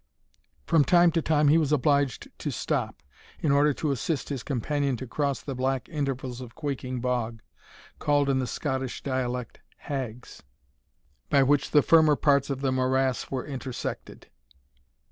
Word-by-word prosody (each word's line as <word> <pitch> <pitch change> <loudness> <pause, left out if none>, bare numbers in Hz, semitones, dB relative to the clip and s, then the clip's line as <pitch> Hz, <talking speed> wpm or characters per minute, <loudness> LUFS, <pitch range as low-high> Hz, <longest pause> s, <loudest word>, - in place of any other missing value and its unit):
From 165 -3 +4
time 175 +2 +5
to 165 0 +1
time 150 -2 +3
he 160 +3 +5
was 150 -3 0
obliged 140 -2 +1
to - - -3
stop, - - -2 0.4
in 150 - +1
order 145 +1 +4
to 150 - -1
assist 140 +3 -2
his 140 -4 -3
companion 140 +1 -1
to 130 - -6
cross 140 +2 -2
the 140 - -4
black 130 0 -1
intervals 130 -5 -3
of 125 -2 -10
quaking 130 -4 -4
bog, 120 -3 -2 0.6
called 145 -1 +2
in 135 -1 +2
the 130 - -1
Scottish 130 -3 -3
dialect 125 -3 -3 0.2
hags, 125 -4 -6 0.9
by 140 - +5
which 140 +1 +2
the 150 -2 +4
firmer 160 -2 +5
parts 140 -1 +2
of 135 -1 -3
the 135 -1 +1
morass 130 0 0
were 130 -2 -3
intersected. 130 -3 -6
135 Hz, 155 wpm, -27 LUFS, 130-145 Hz, 0.9 s, time